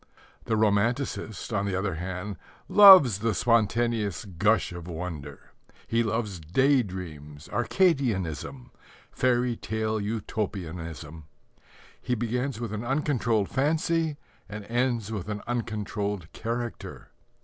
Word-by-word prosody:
The 115 - 0
romanticist, 110 +2 0
on 100 -1 0
the 95 - -1
other 95 0 -1
hand, 90 +3 -5 0.3
loves 185 - +9
the 110 -1 0
spontaneous 115 -1 +1
gush 100 +4 +1
of 85 -1 -8
wonder. 80 -5 -7 0.3
He 115 +1 +1
loves 105 -4 -2
day 130 - +3
dreams, 80 -7 -8
Arcadianism, 120 - 0 0.4
fairy 125 -1 +1
tale 110 -1 -2
Utopianism. 85 -7 -5 0.8
He 125 - -1
begins 120 +2 -2
with 115 -3 -4
an 110 +1 -4
uncontrolled 120 -6 0
fancy 160 +2 0 0.3
and 105 0 -7
ends 120 -2 -1
with 105 -2 -4
an 105 -1 -4
uncontrolled 105 -6 -3
character. 120 +1 -5
110 Hz, 110 wpm, -27 LUFS, 95-120 Hz, 0.8 s, loves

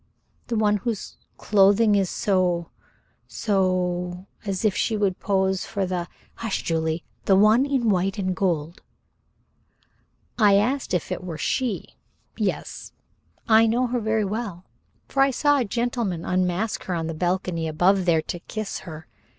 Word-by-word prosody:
"The 235 - -2
one 210 -1 +3
whose 215 +1 -4 0.2
clothing 205 +2 +4
is 195 -3 +2
so 180 -4 0 0.6
so 180 -2 -1 0.2
as 195 +1 -2
if 205 - +2
she 220 - 0
would 195 -3 0
pose 190 -1 0
for 200 -3 -2
the 180 -1 -3
" - - -32
"Hush, 225 -3 -3
Julie. 160 0 -1 0.2
The 195 - +5
one 215 +7 +5
in 265 -4 0
white 195 -1 +1
and 185 -2 -1
gold." 170 -4 -1 1.6
"I 205 -3 +6
asked 235 +1 +1
if 175 - -3
it - - -3
were 170 -4 -5
she. 245 - -1 0.5
Yes, - - -3 0.5
I 225 0 +6
know 240 +3 +2
her 245 0 -1
very 220 -1 0
well, 200 -3 -4 0.4
for 270 - 0
I 275 - +5
saw 290 +2 +2
a 250 - 0
gentleman 230 -5 -2
unmask 185 +3 -1
her 180 - -2
on 165 -1 -2
the 165 - -3
balcony 175 0 -1
above 180 +4 +2
there, 165 -3 +3
to 175 - -5
kiss 215 +3 -5
her. 160 -2 -9
195 Hz, 155 wpm, -24 LUFS, 180-220 Hz, 1.6 s, I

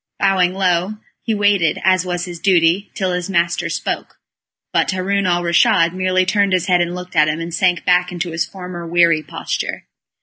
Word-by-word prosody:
Bowing 190 -2 +2
low, 185 +2 0 0.2
he 225 - -2
waited, 205 -5 +2
as 185 -1 +2
was 175 0 -2
his 175 -2 -8
duty, 180 +1 +2
till 190 -2 -1
his 180 +1 -3
master 170 -2 0
spoke, - - -4 0.6
but - - +1
Haroun 195 +1 -1
al 175 -1 +1
Raschid 170 0 +3
merely 185 0 +1
turned 200 0 +1
his 180 -2 +1
head 180 -2 +2
and 175 +1 -2
looked 180 0 -9
at 155 -2 +4
him, 155 +1 -2
and 165 0 -6
sank 175 0 +1
back 180 0 +2
into 175 0 -4
his 160 0 -1
former 180 -2 -8
weary 170 -2 +3
posture. 155 - -5
180 Hz, 190 wpm, -18 LUFS, 170-190 Hz, 0.6 s, at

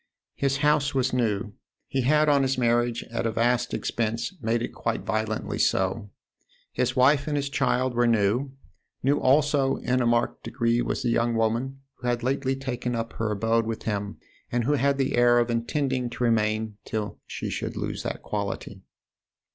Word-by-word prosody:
His 140 0 0
house 145 -1 +2
was 130 -1 +1
new 110 -3 0 0.3
he 135 - -1
had 150 +4 +3
on 145 -2 +4
his 135 -1 +1
marriage, 120 -1 +1
at 115 0 -1
a - - 0
vast 120 +2 +1
expense, 115 - -2
made 115 +1 0
it - - -5
quite - - -2
violently 110 0 -2
so. 95 +3 +1 0.6
His - - 0
wife 140 +3 +4
and 150 -1 0
his 140 -1 -2
child 130 -3 +1
were 120 0 +2
new; 115 +4 +2 0.5
new 140 +3 +3
also 140 0 +3
in 125 +1 0
a 120 - +2
marked 120 0 +1
degree 120 -1 0
was - - -2
the 120 - +1
young 115 0 +1
woman 115 +5 -1 0.2
who 125 - -5
had 120 -1 0
lately 135 +1 0
taken 125 -2 -3
up 115 0 -3
her 115 -1 -2
abode 115 +2 +1
with 115 -1 -4
him 100 -2 -3 0.3
and 120 0 +1
who 145 +6 +1
had 140 0 +2
the 135 -1 0
air 120 0 +5
of 120 0 +2
intending 125 +1 -1
to 125 - -4
remain 110 -2 +1
till 105 -1 -4
she - - -5
should - - -4
lose - - -3
that - - -5
quality. - - -4
120 Hz, 180 wpm, -26 LUFS, 115-135 Hz, 0.6 s, air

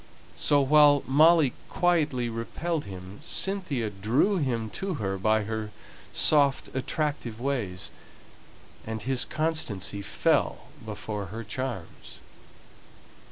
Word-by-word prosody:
So 145 -1 +3
while 145 0 +6
Molly 155 0 +5 0.2
quietly 155 -9 +1
repelled 145 +8 -3
him, 95 0 -9
Cynthia 155 - -1
drew 115 - +1
him 120 -8 -1
to 190 -2 -3
her 95 -6 -2
by 110 +2 +2
her 110 0 -4 0.4
soft 140 -3 +3
attractive 130 -4 -2
ways; 120 -9 -2 0.9
and 110 -1 -5
his 130 +1 +2
constancy 120 - -2
fell - - 0
before 105 -3 -5
her 110 +5 -6
charms. 115 -4 -6
125 Hz, 105 wpm, -27 LUFS, 110-150 Hz, 0.9 s, while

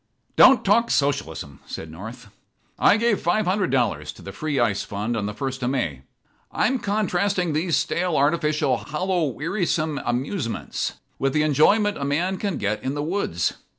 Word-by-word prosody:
"Don't 265 -1 +7
talk 230 +4 +3
Socialism," 80 - -1
said 80 - -7
North. 105 +9 -9 0.5
"I - - +5
gave 230 -3 +1
five 205 +5 +1
hundred 185 0 +1
dollars 105 - 0
to - - -15
the - - -7
free 150 -3 -2
ice 105 -4 +1
fund 105 +4 -3
on 105 -2 -2
the 105 - -4
first 130 +2 -4
of 125 - 0
May. 85 - -2 0.5
I'm 260 0 +1
contrasting 200 -4 0
these 165 +2 +1
stale, 175 -1 0
artificial, 150 -3 +2
hollow, 175 +4 -1
wearisome 155 - -1
'amusements' 125 - -2 0.3
with 135 0 0
the 150 - +2
enjoyment 200 +8 +3
a - - -3
man 170 +7 0
can 195 -5 -2
get 105 +1 -1
in 135 +2 -3
the 145 - -2
woods. 155 - -1
150 Hz, 165 wpm, -23 LUFS, 120-185 Hz, 0.5 s, Don't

